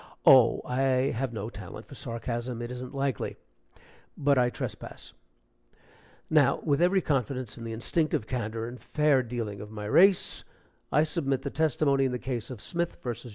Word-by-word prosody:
(Oh, 130 Hz, -4 st, +7 dB
I 130 Hz, +1 st, +1 dB
have 125 Hz, +2 st, -2 dB
no 110 Hz, 0 st, -5 dB
talent 105 Hz, +2 st, -9 dB
for -, -, -13 dB
sarcasm, 120 Hz, -1 st, -4 dB
it 120 Hz, -, -5 dB
isn't 125 Hz, +2 st, -7 dB
likely.) 135 Hz, -4 st, -2 dB, 0.8 s
But 140 Hz, -1 st, +3 dB
I 125 Hz, -2 st, +3 dB
trespass. -, -, -7 dB, 1.1 s
Now, 145 Hz, -4 st, +4 dB
with 145 Hz, 0 st, +1 dB
every 185 Hz, +2 st, +4 dB
confidence 130 Hz, -5 st, -1 dB
in 115 Hz, -, -8 dB
the 115 Hz, -, -4 dB
instinctive 150 Hz, +3 st, 0 dB
candor 115 Hz, -2 st, -3 dB
and 120 Hz, +1 st, -9 dB
fair 150 Hz, -3 st, +2 dB
dealing 115 Hz, -4 st, -4 dB
of 105 Hz, -, -8 dB
my 105 Hz, -1 st, -7 dB
race, 185 Hz, -, +4 dB, 0.5 s
I 150 Hz, -, +4 dB
submit 145 Hz, -5 st, -1 dB
the -, -, -3 dB
testimony 140 Hz, -2 st, +2 dB
in 130 Hz, -, 0 dB
the 125 Hz, -, -1 dB
case 120 Hz, -1 st, -4 dB
of 125 Hz, -5 st, -8 dB
Smith 170 Hz, 0 st, -2 dB
vs. 120 Hz, 0 st, -4 dB
130 Hz, 165 wpm, -28 LUFS, 115-140 Hz, 1.1 s, Oh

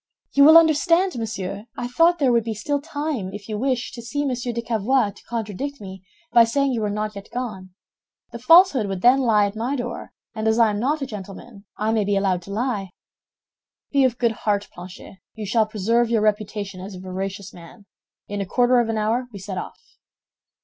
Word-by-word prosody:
"You 280 Hz, 0 st, +6 dB
will 315 Hz, +2 st, +9 dB
understand, 335 Hz, +3 st, +3 dB
monsieur, 210 Hz, -2 st, -5 dB
I 245 Hz, -, -3 dB
thought 330 Hz, +8 st, +3 dB
there 275 Hz, -5 st, +2 dB
would 235 Hz, -1 st, +3 dB
be 225 Hz, -1 st, -4 dB
still 285 Hz, +7 st, -2 dB
time, 290 Hz, -, -4 dB
if 205 Hz, -1 st, -9 dB
you 215 Hz, -, -4 dB
wish, 255 Hz, -1 st, -1 dB
to 235 Hz, -, -9 dB
see 285 Hz, +5 st, -3 dB
Monsieur 250 Hz, -2 st, -2 dB
de 235 Hz, 0 st, -4 dB
Cavois 230 Hz, 0 st, +1 dB
to 200 Hz, -, -18 dB
contradict 235 Hz, +5 st, -4 dB
me 190 Hz, -2 st, -9 dB, 0.3 s
by 235 Hz, -, +8 dB
saying 275 Hz, +4 st, +1 dB
you 235 Hz, -3 st, -1 dB
were 210 Hz, -, -1 dB
not 210 Hz, +1 st, -3 dB
yet 200 Hz, 0 st, -10 dB
gone. 210 Hz, -7 st, -5 dB, 0.6 s
The 235 Hz, -, -7 dB
falsehood 285 Hz, -, +5 dB
would 195 Hz, -2 st, -5 dB
then 250 Hz, +3 st, +6 dB
lie 220 Hz, -5 st, +3 dB
at 200 Hz, +1 st, -4 dB
my 240 Hz, +6 st, -2 dB
door, 245 Hz, -2 st, -5 dB, 0.2 s
and 220 Hz, 0 st, -3 dB
as 220 Hz, 0 st, +2 dB
I 230 Hz, -2 st, +4 dB
am 205 Hz, -, -3 dB
not 285 Hz, +5 st, 0 dB
a -, -, -1 dB
gentleman, 205 Hz, -1 st, -10 dB
I 215 Hz, +1 st, 0 dB
may 220 Hz, -2 st, +1 dB
be 200 Hz, 0 st, 0 dB
allowed 190 Hz, -2 st, 0 dB
to 195 Hz, -, -11 dB
lie." 210 Hz, -3 st, -2 dB, 1.0 s
"Be 280 Hz, -1 st, +3 dB
of 250 Hz, -2 st, +1 dB
good 235 Hz, -2 st, +2 dB
heart, 205 Hz, -2 st, -2 dB
Planchet, 180 Hz, +2 st, -11 dB, 0.2 s
you 220 Hz, -1 st, -6 dB
shall 215 Hz, +2 st, +2 dB
preserve 225 Hz, +3 st, +1 dB
your 230 Hz, -2 st, +2 dB
reputation 210 Hz, -2 st, -2 dB
as 195 Hz, +1 st, -8 dB
a -, -, -9 dB
veracious 190 Hz, +1 st, -6 dB
man. 175 Hz, +5 st, -14 dB, 0.4 s
In 205 Hz, 0 st, -4 dB
a -, -, -2 dB
quarter 245 Hz, +4 st, +3 dB
of 235 Hz, -1 st, 0 dB
an 225 Hz, -, -1 dB
hour 225 Hz, +4 st, 0 dB
we 205 Hz, -, -9 dB
set 190 Hz, -1 st, -5 dB
off." -, -, -8 dB
225 Hz, 210 wpm, -22 LUFS, 200-250 Hz, 1.0 s, will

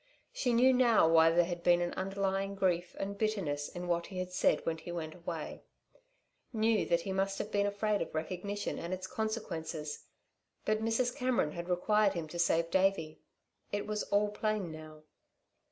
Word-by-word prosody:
She 265 Hz, -, 0 dB
knew 250 Hz, +3 st, +5 dB
now 235 Hz, -8 st, +5 dB
why 165 Hz, 0 st, +6 dB
there 170 Hz, +1 st, +4 dB
had 175 Hz, 0 st, -4 dB
been 175 Hz, 0 st, +4 dB
an 175 Hz, 0 st, -1 dB
underlying 195 Hz, +1 st, -1 dB
grief 180 Hz, -2 st, 0 dB
and 200 Hz, +1 st, -4 dB
bitterness 180 Hz, -10 st, -1 dB
in 175 Hz, 0 st, -6 dB
what 170 Hz, -1 st, 0 dB
he 185 Hz, -2 st, -3 dB
said 180 Hz, 0 st, +1 dB
when 165 Hz, -1 st, -1 dB
he 175 Hz, -, -7 dB
went 160 Hz, -2 st, -4 dB
away; 170 Hz, -3 st, -6 dB, 0.9 s
knew 220 Hz, -2 st, +2 dB
that 170 Hz, 0 st, +2 dB
he 190 Hz, -, -4 dB
must 195 Hz, +1 st, 0 dB
have 205 Hz, -, -4 dB
been 200 Hz, 0 st, +2 dB
afraid 205 Hz, +1 st, 0 dB
of -, -, -4 dB
recognition 185 Hz, +6 st, -3 dB
and 175 Hz, +2 st, -3 dB
its 185 Hz, 0 st, -7 dB
consequences. 165 Hz, -8 st, -4 dB, 0.6 s
But 215 Hz, 0 st, +1 dB
Mrs. 240 Hz, +2 st, +1 dB
Cameron 250 Hz, -, +1 dB
had 170 Hz, +2 st, -6 dB
required 205 Hz, +3 st, +3 dB
him 165 Hz, -2 st, -3 dB
to 175 Hz, -, -6 dB
save 170 Hz, 0 st, +2 dB
Davey. 190 Hz, -4 st, +1 dB, 0.5 s
It 205 Hz, 0 st, -2 dB
was 210 Hz, 0 st, -2 dB
all 205 Hz, +1 st, +2 dB
plain 210 Hz, -4 st, -2 dB
now. 155 Hz, -1 st, -10 dB
190 Hz, 175 wpm, -32 LUFS, 170-210 Hz, 0.9 s, why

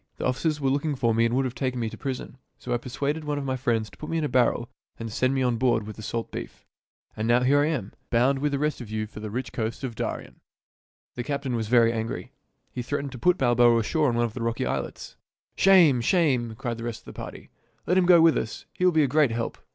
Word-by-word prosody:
The -, -, -3 dB
officers 150 Hz, +4 st, 0 dB
were 135 Hz, -2 st, +1 dB
looking 145 Hz, +2 st, 0 dB
for 115 Hz, -3 st, +1 dB
me 115 Hz, +1 st, +3 dB
and 115 Hz, +1 st, +1 dB
would 135 Hz, 0 st, +2 dB
have 125 Hz, -, -3 dB
taken 125 Hz, 0 st, -2 dB
me 115 Hz, -, -1 dB
to -, -, -7 dB
prison. 135 Hz, -1 st, -5 dB, 0.2 s
So 125 Hz, -, -4 dB
I -, -, +2 dB
persuaded 140 Hz, +5 st, -3 dB
one 150 Hz, -1 st, -2 dB
of 145 Hz, -, -3 dB
my 130 Hz, -1 st, -1 dB
friends 120 Hz, -4 st, 0 dB
to 90 Hz, -, -16 dB
put -, -, -7 dB
me 165 Hz, -, -1 dB
in 160 Hz, -, 0 dB
a -, -, +1 dB
barrel 120 Hz, -1 st, +2 dB, 0.3 s
and 115 Hz, -1 st, -6 dB
send 130 Hz, +5 st, +1 dB
me 135 Hz, -, +1 dB
on 125 Hz, -2 st, +1 dB
board 115 Hz, -3 st, +1 dB
with 110 Hz, -, -8 dB
the -, -, -9 dB
salt 115 Hz, +2 st, -4 dB
beef. -, -, -8 dB, 0.5 s
And 110 Hz, +1 st, -2 dB
now 120 Hz, +1 st, +4 dB
here 140 Hz, +3 st, +4 dB
I 145 Hz, -, +2 dB
am, 130 Hz, -11 st, -3 dB, 0.2 s
bound 130 Hz, +4 st, +2 dB
with 145 Hz, +1 st, 0 dB
the 140 Hz, -, 0 dB
rest 150 Hz, -1 st, -1 dB
of 115 Hz, -, -8 dB
you 110 Hz, 0 st, -2 dB
for 105 Hz, -, -11 dB
the 105 Hz, 0 st, -5 dB
rich 120 Hz, +2 st, -4 dB
coast 115 Hz, +3 st, -3 dB
of 130 Hz, -3 st, -3 dB
Darien." -, -, -5 dB, 0.7 s
The 120 Hz, -, -4 dB
captain 140 Hz, -1 st, -3 dB
was 110 Hz, -2 st, -2 dB
very 115 Hz, 0 st, +4 dB
angry. 110 Hz, 0 st, -4 dB, 0.4 s
He 125 Hz, -, -4 dB
threatened 140 Hz, +2 st, -3 dB
to 125 Hz, -, -9 dB
put 180 Hz, +5 st, +3 dB
Balboa 120 Hz, -2 st, +4 dB
ashore 145 Hz, +6 st, +1 dB
on 120 Hz, -, -1 dB
one 120 Hz, 0 st, +2 dB
of 115 Hz, -, -5 dB
the 125 Hz, -, -6 dB
rocky 115 Hz, 0 st, -1 dB
islets. -, -, -4 dB, 0.2 s
" -, -, -74 dB
Shame! 175 Hz, -10 st, +6 dB
shame! 125 Hz, -7 st, +1 dB
" -, -, -25 dB
cried 120 Hz, -3 st, -4 dB
the -, -, -6 dB
rest 115 Hz, -2 st, -5 dB
of -, -, -32 dB
the -, -, -10 dB
party. -, -, -9 dB, 0.2 s
" -, -, -41 dB
Let 180 Hz, -, +2 dB
him 185 Hz, -1 st, +3 dB
go 175 Hz, -2 st, +7 dB
with 165 Hz, -1 st, +6 dB
us. 110 Hz, -, -6 dB
He -, -, -4 dB
will 180 Hz, -, +6 dB
be 160 Hz, -2 st, +3 dB
a -, -, +2 dB
great 145 Hz, +1 st, +3 dB
help." 115 Hz, 0 st, -3 dB
125 Hz, 275 wpm, -26 LUFS, 115-145 Hz, 0.7 s, go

